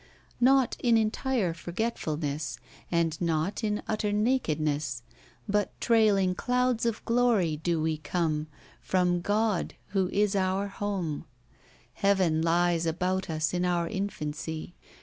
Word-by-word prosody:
Not 260 0 +4
in 235 -2 +4
entire 220 -2 0
f 165 0 -12
orgetfulness. 155 -7 -2 0.3
And 165 -2 0
not 165 +6 0
in 210 -1 -1
utter 215 -1 -1
nakedness, 155 - 0 0.4
But 205 0 -1
trailing 210 -5 +3
clouds 250 +2 +1
of 225 -1 -3
g\ocy 225 -10 +2
do 170 -1 0
we 155 0 0
come 155 -2 -1 0.4
Prom 180 -1 +2
God, 210 0 0
who 190 -2 +1
is 205 0 +1
our 190 +1 0
home: 195 -7 -3 0.7
Heaven 185 -3 +2
li^ 170 0 +2
about 185 +3 -1
us 155 0 -1
in 180 0 0
our 175 -1 +1
infancy. 160 -5 -4
185 Hz, 125 wpm, -28 LUFS, 160-210 Hz, 0.7 s, Not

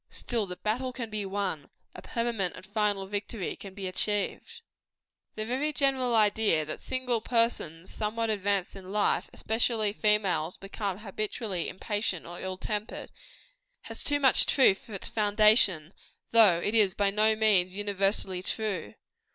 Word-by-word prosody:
Still, 230 -4 -3
the 180 - -6
battle 225 +7 -2
can 235 -3 -6
be 210 -2 -3
won: 190 -7 -3 0.2
a - - -10
permanent 230 -6 -2
and - - -11
final 205 -1 -1
victory 205 0 -4
can 195 -2 -11
be 200 -1 -6
achieved. 210 - -2 0.7
The 215 - -3
very 265 +6 -1
general 270 -4 +1
idea, 210 -7 +3
that 155 - -7
single 255 -3 -2
persons 220 -9 -1
somewhat 220 +1 -1
advanced 200 -2 -1
in 190 -1 -10
life, 210 0 +1
especially 220 -2 0
females, 200 -6 +1
become 195 -1 -4
habitually 210 -2 -4
impatient 205 -3 -3
or 175 +1 -7
ill 185 0 -4
tempered, 210 +2 -4 0.7
has - - -4
too 290 0 +1
much 265 -2 +5
truth 225 -8 +4
for 225 -6 -10
its 195 - -2
foundation, 210 -5 +4 0.4
though 215 -7 +6
it 205 +5 -2
is 210 -4 +4
by 200 -1 +2
no 215 +2 +3
means 195 -4 +2
universally 195 -2 0
true. 190 - -3
210 Hz, 150 wpm, -28 LUFS, 190-225 Hz, 0.7 s, though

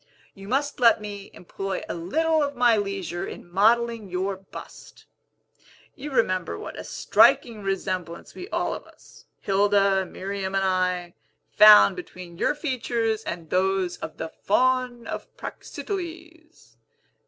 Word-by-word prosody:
You 195 0 -12
must 275 +5 -1
let 235 -2 +5
me 205 -1 -8
employ 195 +2 -5
a - - -3
little 315 - +1
of 285 -1 -1
my 240 -2 +4
leisure 195 -4 -3
in - - -9
modelling 225 +3 +2
your 190 +2 -2
bust. 190 0 -12 0.9
You 285 +3 -7
remember 185 -9 0
what - - -8
a - - -7
striking 225 -3 +3
resemblance 185 -3 -4
we 365 +2 -9
all - - -1
of - - -8
us - - -19 0.2
Hilda, 195 -1 +2
Miriam, 195 +1 -4
and 195 - +2
I 180 -2 0 0.4
found 210 -2 +8
between 180 -1 -10
your - - +1
features 235 -6 -1
and 170 -2 -6
those 190 -1 +1
of 160 - -8
the 160 - -5
Faun 250 +4 0
of - - -6
Praxiteles. 335 -4 -8
200 Hz, 135 wpm, -25 LUFS, 185-245 Hz, 0.9 s, found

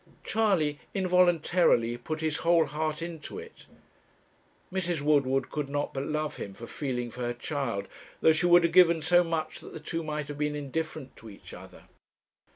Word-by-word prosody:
Charley 180 -10 +1 0.2
involuntarily 175 -9 +3
put 155 +6 -5
his 155 -1 0
whole 165 0 +3
heart 155 +2 -3
into 170 - -7
it. 455 +1 -11 1.1
Mrs. 175 -4 -1
Woodward 135 -3 +2
could 150 -2 -3
not 145 +1 -2
but 135 +1 -3
love 155 0 -2
him 100 -1 -7
for 115 - -9
feeling 125 -3 -4
for 125 - -8
her 120 0 -2
child, 120 -6 -3 0.3
though 160 - +5
she 175 +3 +1
would 175 0 +7
have 170 0 +1
given 170 -3 +6
so 175 +2 +5
much 165 -2 -3
that - - -12
the - - -7
two 165 - -4
might 150 -2 -4
have 145 0 -7
been 150 0 0
indifferent 150 0 -5
to 110 - -11
each 100 - -13
other. - - -12
155 Hz, 175 wpm, -28 LUFS, 140-170 Hz, 1.1 s, would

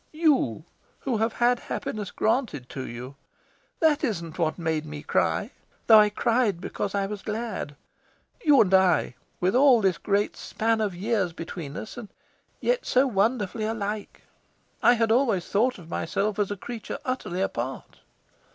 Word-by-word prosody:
"You, 285 - +2 0.4
who 255 -4 -1
have 225 +1 0
had 245 0 +2
happiness 210 -3 -4
granted 220 - -1
to 130 -1 -6
you. 125 +4 -8 0.6
That 310 -2 +3
isn't 170 - -3
what 160 -2 0
made 160 -3 -1
me 150 -1 -8
cry, - - 0 0.3
though. 220 -2 +9
I 210 0 +5
cried 225 -3 +1
because 195 +2 -4
I 200 -1 +1
was 205 0 -5
glad. 215 -9 -4 0.7
You 290 -3 +6
and 190 -3 +2
I, 180 -11 +4 0.3
with 185 +2 +1
all 260 -2 +6
this 190 -6 +1
great 205 0 0
span 225 0 -1
of 205 -4 -1
years 195 -2 0
between 165 -3 -7
us, 220 - -7
and 230 -4 -8 0.5
yet - - +1
so 255 +2 +4
wonderfully 215 -1 0
alike! 215 -1 -4 0.6
I 240 - +6
had 225 -1 +1
always 225 -7 +2
thought 245 +5 +1
of 175 -4 -13
myself 200 +5 -1
as 205 - +1
a 205 - -4
creature 230 +3 -6
utterly 220 -8 -2
apart." 130 -8 -4
210 Hz, 160 wpm, -26 LUFS, 175-235 Hz, 0.7 s, though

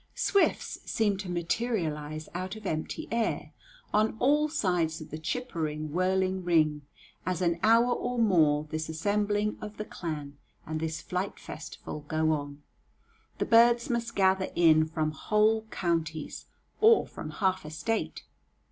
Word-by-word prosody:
Swifts 400 - +1
seem 210 -3 +1
to 190 -1 -6
materialize 165 -5 -2
out 185 +2 -4
of 215 -1 -11
empty 185 - -3
air 230 -1 -1 0.4
on 215 +1 +2
all 295 +5 +3
sides 175 - 0
of 155 - -10
the 155 - -5
chippering, 155 - -3
whirling 185 +2 +1
ring, 155 -4 +2 0.4
as 180 -1 -1
an 170 -2 +1
hour 230 +3 +5
or 245 0 -3
more 160 -10 +4
this 155 0 -3
assembling 205 +5 0
of 210 0 -7
the 215 - -4
clan 150 -6 -6 0.3
and 155 0 -3
this 160 0 -3
flight 185 +2 -3
festival 155 0 -8
go 155 +1 +1
on. 145 -1 -4 0.7
The - - 0
birds 235 +2 +5
must 235 -1 -2
gather 190 -1 +3
in 160 -2 +5
from 155 -1 -1
whole 215 +6 +2
counties, 165 -5 -2 0.3
or 450 +1 +6
from - - -8
half 190 -2 0
a 155 - -7
State. 170 +9 -2
180 Hz, 145 wpm, -29 LUFS, 155-215 Hz, 0.7 s, or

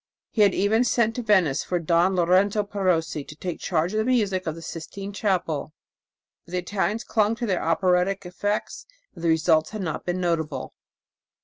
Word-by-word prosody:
He 220 - +1
had 200 -2 +5
even 215 +4 +3
sent 235 -2 +2
to 245 - -3
Venice 190 - +2
for 180 - -1
Don 170 +3 +2
Lorenzo 185 +4 +3
Perosi 180 -7 -1
to 150 - -11
take 175 +2 -5
charge 170 +2 0
of 215 - +1
the - - +2
music 205 -7 +1
of 160 - -2
the 165 - -9
Sistine 195 +5 -7
Chapel; 170 -7 -1 0.7
but 170 - -15
the - - 0
Italians 205 +4 -1
clung 215 0 +1
to 240 - -3
their 190 -5 0
operatic 180 +3 +1
effects, 205 - -3 0.3
and 165 - -11
the 170 - +2
results 160 -1 +3
had 215 -2 -5
not 160 -4 -3
been 180 +1 -2
notable. 160 -6 -2
185 Hz, 185 wpm, -25 LUFS, 165-205 Hz, 0.7 s, had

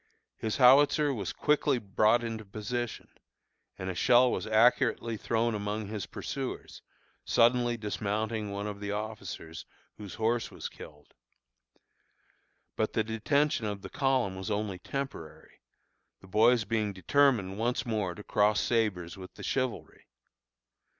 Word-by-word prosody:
His 110 -1 -2
howitzer 140 +3 +5
was 100 -8 -3
quickly 150 -2 +1
brought 110 +2 +2
into 115 -1 -4
position, 110 +4 -4 0.7
and 95 - -5
a 95 - -2
shell 125 +6 +4
was - - -3
accurately 115 +1 +3
thrown 115 +2 0
among 105 0 -3
his 105 -4 -4
pursuers, - - -6 0.4
suddenly 120 0 +3
dismounting 110 0 -2
one 100 +1 -4
of 105 -1 -5
the 100 0 -4
officers, 105 -6 -6 0.3
whose 105 -3 -8
horse 115 +1 0
was - - -7
killed. 75 -1 -14 1.6
But 110 - -1
the 110 - +1
detention 115 +3 0
of 100 -1 -5
the - - -8
column 130 -8 +1
was 95 +3 -5
only 105 -3 -2
temporary, 135 - -7 0.6
the 95 - -16
boys 115 +3 +4
being 105 -1 -1
determined 105 -2 +2
once 120 +1 0
more 105 -6 -2
to 105 - -10
cross 105 0 +2
sabres 100 -7 0
with 95 -1 -11
the - - -10
chivalry. 130 -3 -3
110 Hz, 135 wpm, -29 LUFS, 100-120 Hz, 1.6 s, howitzer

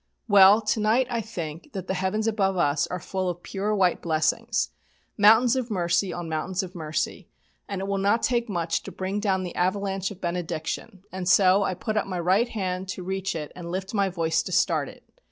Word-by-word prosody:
Well, 200 +2 +7
to 220 +1 0
night 220 +5 +3
I 235 -1 0
think 170 - -7
that 190 -2 -5
the 190 - -2
heavens 190 +3 -1
above 195 -4 +1
us 145 -3 +2
are 180 - -4
full 185 +2 -2
of 175 0 -6
pure 205 +2 -2
white 185 -4 +2
blessings, 170 +8 0 0.4
mountains 225 +4 +6
of 255 -2 -2
mercy 180 -1 +1
on 175 -1 -5
mountains 175 +4 -2
of 185 -1 -8
mercy, 155 -3 -3 0.4
and 195 -2 -3
it 195 - -3
will 200 0 -1
not 205 +4 +2
take 240 -2 +1
much 170 -3 -1
to - - -9
bring 190 +2 -3
down 190 -3 0
the 180 - -5
avalanche 195 +1 0
of 200 - -10
benediction, 175 +3 -4
and 185 -1 -3
so 190 0 +5
I 190 -2 0
put 215 +3 -3
up 210 - 0
my 185 -2 -3
right 190 +8 +2
hand 185 -4 -3
to 185 - -5
reach 190 0 -3
it 150 -2 -5
and 170 -1 -7
lift 190 +2 -4
my 200 -2 +2
voice, 165 -2 0
to - - -7
start 180 - +1
it. - - -15
190 Hz, 210 wpm, -25 LUFS, 175-205 Hz, 0.4 s, Well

